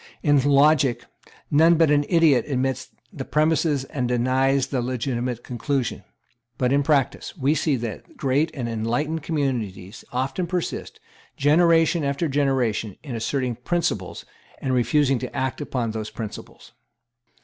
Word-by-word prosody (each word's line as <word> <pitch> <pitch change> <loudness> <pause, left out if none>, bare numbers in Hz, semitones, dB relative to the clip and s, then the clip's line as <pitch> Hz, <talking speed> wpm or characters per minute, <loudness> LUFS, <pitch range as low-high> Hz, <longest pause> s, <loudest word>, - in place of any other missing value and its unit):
In 145 -3 +4
logic, 140 -1 +3 0.5
none 165 +3 +5
but 160 -2 +3
an 145 0 +3
idiot 165 -7 +4
admits 130 -2 -2 0.2
the 135 - -5
premises 150 -1 +1
and 135 -2 -3
denies 130 +2 +2
the 130 -3 -2
legitimate 125 -1 -3
conclusion. 130 +1 -2 0.5
But 125 +1 +1
in 140 - +3
practice, 140 +2 0
we 140 0 +2
see 155 -2 +1
that 115 -3 -7
great 140 +4 +1
and 125 -4 -3
enlightened 120 +8 -2
communities 120 - -3
often 135 +8 -2
persist, 180 -1 -4 0.4
generation 165 +2 +4
after 140 +4 -1
generation, 130 -7 0
in 140 -5 -6
asserting 120 +1 -2
principles, 125 - -2 0.3
and 130 - -2
refusing 135 +1 +2
to - - -6
act 130 +1 -2
upon 125 -6 -2
those 110 -1 -5
principles. 110 -3 -9
135 Hz, 135 wpm, -23 LUFS, 125-150 Hz, 0.5 s, none